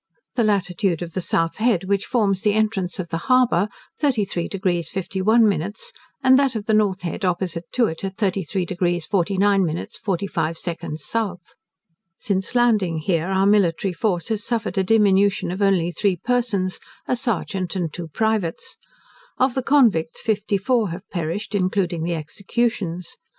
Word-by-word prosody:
The 235 - +1
latitude 190 -4 0
of 170 -1 -8
the 185 - -2
south 165 -1 0
head 215 -5 +2
which 200 +1 -1
forms 205 -6 +1
the 210 - +2
entrance 210 -5 0
of 175 -2 -5
the 165 - -2
harbour, 240 -7 +4 0.3
33 210 - 0
deg 180 -4 -1
51 200 +4 +2
min, 195 -1 0 0.5
and 260 0 +6
that 270 -3 +1
of 210 -2 -3
the 220 - +1
north 200 -3 +2
head 175 +4 -4
opposite 175 -2 -1
to 245 - +3
it 160 -4 -4
at 195 0 -4
33 190 -3 -1
deg 175 -1 -1
49 195 +2 +2
min 165 -1 -2
45 170 -4 -1
sec 170 0 -4 0.2
south. 180 +2 -4 0.6
Since 200 0 -2
landing 215 -9 +3
here 165 +1 0
our 190 0 +2
military 195 -2 +2
force 175 -2 -1
has 215 -2 -1
suffered 225 -5 -1
a - - +2
diminution 200 -2 +3
of 185 +3 -4
only 185 -4 +2
three 195 +1 +1
persons, 210 -3 0 0.3
a - - +1
serjeant 195 -6 -2
and 170 -5 -2
two 175 -2 -6
privates. 210 0 -1 0.6
Of 255 0 +2
the 265 - -1
convicts 235 - +3
fifty 210 -2 0
four 225 0 +1
have 180 +4 -7
perished, 175 +5 -3
including 185 -3 0
the 170 +1 -1
executions. 180 +1 -3
195 Hz, 160 wpm, -22 LUFS, 175-215 Hz, 0.6 s, and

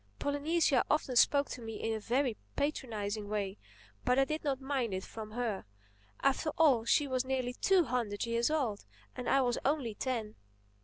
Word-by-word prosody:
Polynesia 285 -1 +2
often 295 -4 +1
spoke 280 +4 +5
to 250 - -6
me 225 -1 -6
in 225 +1 -2
a 220 - -2
very 245 +2 0 0.2
patronizing 215 -8 -2
way. 205 -1 -2 0.4
But 250 +1 +2
I 270 - +5
did 310 +3 -3
not 275 -3 0
mind 265 -7 -1
it 185 - -4
from 215 -1 -8
her. 230 -4 -2 0.6
After 275 +3 +2
all, 270 -8 +5
she 290 +5 +4
was 260 -1 0
nearly 260 -1 -1
two 375 +7 +3
hundred 235 -6 -1
years 235 +2 +1
old; 260 -10 -1 0.3
and 250 - -3
I 275 - +4
was 245 -2 +1
only 270 -5 0
ten. 225 -2 -3
250 Hz, 175 wpm, -32 LUFS, 225-280 Hz, 0.6 s, spoke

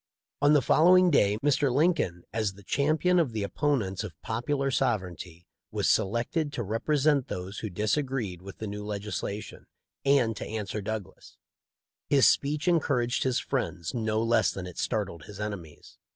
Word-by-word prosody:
On 145 +1 +5
the 145 -3 +4
fol 155 - +4
lowing 180 0 +6
day 105 -7 +3
Mr. 145 -1 +2
Lincoln, 145 - +1
as 110 -3 -1
the 100 - -15
champion 155 - +2
of 145 -9 +1
the 110 -2 -2
opponents 110 -5 -1
of 85 -8 -9
Popular 135 +5 -1
Sovereignty, 95 -9 -2 0.2
was - - -1
selected 120 - 0
to 120 - -2
represent 140 +6 +1
those 90 +3 -5
who 110 - -4
disagreed 105 - -1
with 95 -1 -10
the 110 - -5
new 105 0 -5
legisla 105 0 -4
tion, - - -13 0.4
and 135 -5 +3
to - - -5
answer 105 -1 -4
Douglas. 105 -2 -7 0.7
His 140 -2 +6
speech 150 +4 +1
encouraged 140 -8 +1
his 130 -2 +1
friends 85 -3 -3
no 110 -1 0
less 115 +1 +3
than 95 - -5
it 90 -1 -8
startled 90 -4 -2
his 105 -1 -11
enemies. 100 -8 -7
110 Hz, 165 wpm, -28 LUFS, 100-140 Hz, 0.7 s, lowing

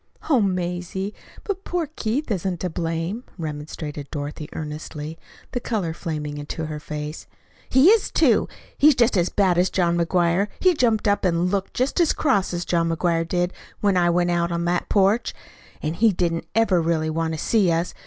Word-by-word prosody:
"Oh, 260 -5 +5
Mazie, 180 +1 -2 0.3
but 395 -2 -4
poor 355 -2 -1
Keith 240 +5 -2
isn't 185 -2 -1
to 180 - -2
blame," 165 +7 -3
remonstrated 150 -2 -6
Dorothy 150 +1 -5
earnestly, 155 0 -6 0.3
the 245 - -1
color 205 -9 -2
flaming 150 -3 -4
into 150 +2 -5
her 155 -1 -5
face. 150 +1 -6 0.4
"He 265 +7 +6
is, 445 -1 +4
too. - - +3 0.3
He's 295 -1 +6
just 235 -2 +3
as 175 -1 +2
bad 185 -4 +2
as 180 - +3
John 175 -2 +1
McGuire. 175 +2 +2
He 370 -1 +4
jumped 230 -8 +1
up 205 0 +2
and 180 0 +1
looked 195 -1 -2
just 260 +7 0
as 340 - +4
cross 255 -11 +1
as 175 0 -3
John 165 -1 +1
McGuire 165 0 0
did 175 +1 0 0.3
when 200 -2 +3
I 175 -1 +3
went 175 0 +2
out 170 0 0
on 170 0 -1
to - - -2
that 175 0 0
porch. 200 +3 +2 0.5
And 155 +2 -1
he 220 +3 +4
doesn't 170 -3 -1
ever 215 -6 +3
really 160 -1 0
want 160 0 -1
to - - -6
see 195 +2 +2
us. 165 +2 0
175 Hz, 185 wpm, -23 LUFS, 165-205 Hz, 0.5 s, He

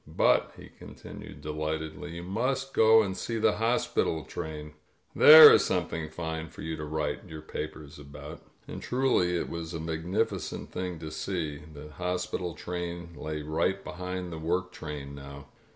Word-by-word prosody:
But," - - +2
he - - -12
continued - - -11
de 75 +1 -5
lightedly, 80 +3 -4
"you 85 - -6
must 130 +8 -2
go 110 0 +6
and 95 -2 -3
see 115 +3 -3
the 110 - +2
hospital 115 -8 0
train. 75 +2 -6 0.4
There 155 +1 +11
is - - +5
something 80 -2 -2
fine 80 0 -5
for - - -10
you 80 0 -3
to 75 - -5
write 75 0 -3
your 80 -2 -9
papers 75 -1 -7
about. 70 0 -9
•. - - -28 0.2
." - - -35
And - - -7
truly 125 -9 +1
it - - -2
was 85 0 -5
a - - -3
magnificent 85 +7 -2
thing 90 -2 -4
to 80 -1 -7
see. 75 -2 -3
The 75 0 -10
hospital 90 0 -3
train 85 -1 -5
lay 75 0 -5
right 85 +6 0
behind 90 0 -5
the 80 - -6
work 90 +3 -1
train 75 -3 -7
now. 70 0 -10
80 Hz, 170 wpm, -29 LUFS, 75-90 Hz, 0.4 s, There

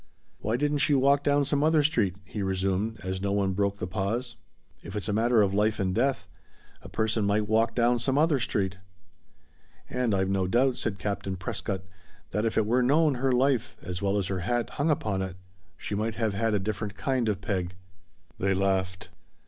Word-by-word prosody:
"Why 110 +3 -1
didn't 145 +1 0
she 145 +1 +4
walk 140 +1 +3
down 145 0 +3
some 145 +1 +1
other 155 -1 +4
street," 115 - +1
he 105 +1 -5
resumed, 95 +3 -1
as 95 0 -3
no 100 0 -1
one 100 -1 +1
broke 100 +1 0
the 90 - -3
pause. 105 +7 -2 0.5
"If 95 - -9
it's 105 - -3
a 105 - 0
matter 115 +1 +4
of 100 -1 0
life 105 +2 +1
and 95 -1 0
death 130 -5 0 0.5
a - - -11
person 110 0 0
might 105 +1 +1
walk 115 +1 +2
down 120 0 +3
some 130 +3 0
other 155 -2 +3
street!" 95 -6 -1 1.1
"And 125 -4 0
I've 95 0 +1
no 95 -1 0
doubt," 125 +5 +2
said 105 -3 -2
Captain 100 -2 -3
Prescott, 95 +1 -4 0.5
"that 105 +3 0
if 115 - -1
it 110 - +3
were 120 +4 +2
known 150 +4 +4
her 135 -1 +2
life, 125 -1 +1
as 90 -1 -5
well 100 0 +1
as 100 - 0
her 95 0 -2
hat, 120 +6 -1
hung 145 +2 0
upon 105 -10 0
it 95 -1 -4 0.4
she - - -5
might 110 +2 -1
have 110 -3 0
had 110 +2 +1
a - - +2
different 105 +1 -3
kind 120 +2 0
of 100 -3 -1
peg." 95 -2 -3 0.6
They 95 0 +1
laughed. 95 -1 -1
105 Hz, 200 wpm, -27 LUFS, 95-125 Hz, 1.1 s, she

